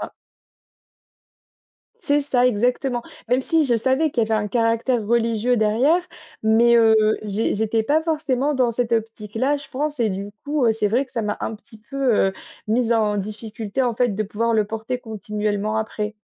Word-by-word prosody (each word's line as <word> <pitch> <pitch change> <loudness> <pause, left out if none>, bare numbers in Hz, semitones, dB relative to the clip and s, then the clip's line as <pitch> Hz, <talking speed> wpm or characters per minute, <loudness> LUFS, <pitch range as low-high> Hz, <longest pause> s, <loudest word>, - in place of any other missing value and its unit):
ça. - - -6 1.9
C'est 290 0 +2
ça 250 -3 +2
exactement. 245 +2 0 0.3
Même 250 +2 +2
si 320 0 +2
je 240 -3 +2
savais 265 +7 +1
qu'il 240 - 0
y - - +1
avait 220 -1 +2
un 210 - -4
caractère 230 +1 +1
religieux 230 +1 +1
derrière, 235 +11 +3 0.4
mais, 230 +2 +4
heu, 225 -1 +5 0.3
j'é 210 +1 -1
j'étais 220 +1 0
pas 300 +7 +1
forcément 295 -3 0
dans 255 -3 +2
cette 235 0 -2
optique-là, 225 +4 -1
je 280 - -12
pense 290 +1 -3
et 225 - +3
du 200 +1 -4
coup, 290 -2 0
heu, 225 - +4
c'est 215 -2 0
vrai 245 +6 +1
que 260 - -27
ça 230 - -1
m'a 210 -1 -2
un 220 - -3
petit 220 +1 -16
peu, 275 -4 +1
heu, - - -4 0.4
mise 235 +1 +2
en 215 -2 +1
difficulté 215 +3 -4
en 245 -2 0
fait 245 +2 +2
de 215 - -1
pouvoir 225 +3 -1
le 215 -1 +3
porter 225 +4 -4
continuellement 210 -2 -3
après. 215 -1 -3
230 Hz, 185 wpm, -22 LUFS, 215-255 Hz, 1.9 s, heu